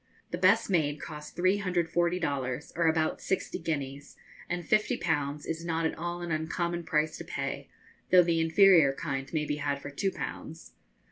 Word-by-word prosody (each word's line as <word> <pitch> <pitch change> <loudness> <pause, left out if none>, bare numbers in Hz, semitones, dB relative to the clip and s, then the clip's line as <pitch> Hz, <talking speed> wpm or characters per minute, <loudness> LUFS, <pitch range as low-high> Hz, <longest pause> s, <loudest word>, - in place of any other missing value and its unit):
The - - -2
best 200 +5 +4
made 150 -6 +1
cost 150 -1 -8
340 180 -2 +1
dollars, 140 -4 -3
or 170 -1 +2
about 160 -1 +1
sixty 190 - -2
guineas, 145 -3 -4 0.3
and 175 -1 -3
fifty 215 +3 +2
pounds 145 -3 -1
is 165 +1 -4
not 165 -1 -1
at 160 - 0
all 175 +1 -4
an 170 - -4
uncommon 170 +2 -2
price 155 0 0
to - - -5
pay, - - -4 0.4
though 180 -1 +7
the 165 -1 +1
inferior 165 -3 +6
kind 135 -2 -4
may 155 -2 0
be 150 0 -2
had 145 -1 -1
for 145 - -8
two 195 +7 0
pounds. 165 -3 -7
165 Hz, 175 wpm, -29 LUFS, 150-175 Hz, 0.4 s, though